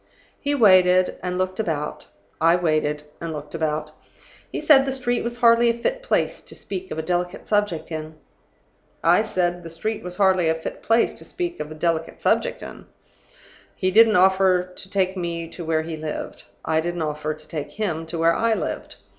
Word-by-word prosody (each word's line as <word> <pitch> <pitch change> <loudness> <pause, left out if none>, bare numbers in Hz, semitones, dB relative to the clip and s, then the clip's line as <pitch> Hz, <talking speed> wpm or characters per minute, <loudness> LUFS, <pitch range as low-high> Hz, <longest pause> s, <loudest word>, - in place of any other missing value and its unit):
"He 290 0 0
waited, 185 -6 +5
and 180 0 -3
looked 185 +1 -2
about. 155 -7 -3 0.4
I 170 - +6
waited, 155 -3 0 0.2
and 165 -1 -4
looked 150 -1 -7
about. 155 -1 -2 0.6
He - - -3
said 275 -3 +6
the - - 0
street 245 -2 -1
was 235 0 -4
hardly 235 0 +5
a 230 - +1
fit - - -1
place - - 0
to - - -13
speak 190 -1 -6
of - - -5
a 160 - -2
delicate 175 +2 -2
subject 205 -7 0
in. 155 0 -5 0.9
I 170 +4 +5
said 180 -5 -1
the 165 - -9
street 210 +7 -3
was 180 0 -7
hardly 185 -4 +3
a 160 - +2
fit 160 - -7
place 230 +1 +2
to - - -12
speak 350 -1 -4
of 150 - -4
a - - -7
delicate 165 0 -1
subject - - 0
in. - - -10 0.9
He 185 0 0
didn't 220 +2 +6
offer 190 0 +4
to 190 - -9
take 190 -1 0
me 170 -2 -3
to 175 - -8
where 160 -1 0
he 160 0 -5
lived. 155 -1 -6 0.2
I 160 0 +2
didn't 175 0 -3
offer 150 0 -3
to 155 0 -14
take 150 -2 -6
him 165 -7 -3
to 165 +1 -4
where 165 +1 +4
I 225 +4 +2
lived. - - -4
180 Hz, 195 wpm, -23 LUFS, 160-205 Hz, 0.9 s, I